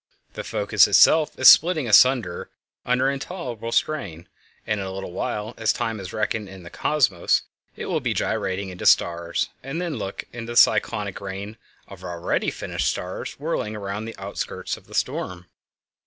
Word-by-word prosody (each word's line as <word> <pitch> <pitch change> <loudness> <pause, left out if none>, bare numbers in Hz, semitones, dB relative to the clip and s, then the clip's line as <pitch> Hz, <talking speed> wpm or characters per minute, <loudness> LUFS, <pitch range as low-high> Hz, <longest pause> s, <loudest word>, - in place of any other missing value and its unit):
The - - -6
focus - - +3
itself 155 -1 +5
is 130 - +5
splitting 160 -5 +7
asunder 110 -5 +4 0.4
under 125 +1 +2
the 135 - +3
intolerable 130 - -6
strain, 90 - -1 0.4
and 110 -1 -1
in 95 - -3
a - - -5
little 95 -1 -6
while, 105 +4 -3
as 110 -1 +2
time 115 -3 -3
is 95 -1 -7
reckoned 105 -1 -2
in 95 -1 -11
the 85 - -11
Cosmos, 125 - +1 0.3
it - - -6
will - - -1
be - - -2
gyrating 95 +1 -2
into 90 -1 -3
stars. 85 0 +2
And 135 +5 -5
then 170 -6 -3
look 100 -2 -5
at 115 -1 -7
the 120 - -6
cyclonic 105 -4 +3
rain 100 +2 -6 0.3
of 95 -2 -12
already 85 -2 -1
finished - - -2
stars - - -5
whirling 105 +1 -3
round 100 +2 -5
the 115 - -8
outskirts 100 +1 -4
of - - -17
the - - -10
storm. 90 -1 -2
105 Hz, 170 wpm, -23 LUFS, 95-125 Hz, 0.4 s, splitting